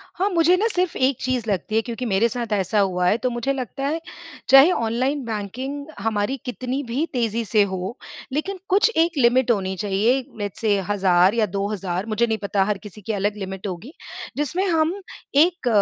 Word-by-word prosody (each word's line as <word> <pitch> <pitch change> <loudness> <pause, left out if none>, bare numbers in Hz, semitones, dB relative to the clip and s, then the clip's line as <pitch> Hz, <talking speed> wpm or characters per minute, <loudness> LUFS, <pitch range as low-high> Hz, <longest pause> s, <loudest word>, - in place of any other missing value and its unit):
हाँ, 385 +3 +1
मुझे 345 -1 +4
ना 430 +4 +2
सिर्फ़ 365 -5 -1
एक 260 +1 +2
चीज़ 250 -4 -1
लगती 200 +2 -1
है 225 - +4
क्योंकि 235 +2 -5
मेरे 215 +1 +2
साथ 235 -2 -4
ऐसा 200 +1 +1
हुआ 180 -2 +1
है। 210 - +3
तो 255 +1 -1
मुझे 240 +3 -1
लगता 270 +1 -4
है, 310 +4 -1 0.5
चाहे 270 +6 +8
ऑनलाइन 260 +2 0
बैंकिंग 250 +7 -5
हमारी 210 +3 -1
कितनी 255 +2 -3
भी 260 +7 0
तेज़ी 230 -2 0
से 210 +1 +3
हो, 190 +4 -4 0.4
लेकिन 375 +7 -2
कुछ 400 +5 +4
एक 330 0 +2
लिमिट 250 -1 +4
होनी 190 -3 -1
चाहिए। 210 +6 +1 0.2
लेट्स 205 -2 -4
सेय, 210 -3 +2
1000 190 -2 +4
या 225 -2 +3
2000 195 -2 -3
मुझे 230 +1 +1
नहीं 220 -1 0
पता 200 -1 0
हर 210 0 0
किसी 210 0 -11
की 220 +3 -3
अलग 205 +1 -1
लिमिट 190 0 -5
होगी। 195 - -7 0.4
जिसमें 340 +7 0
हम 325 -1 +2 0.5
एक 350 -7 -4
230 Hz, 190 wpm, -22 LUFS, 200-275 Hz, 0.5 s, चाहे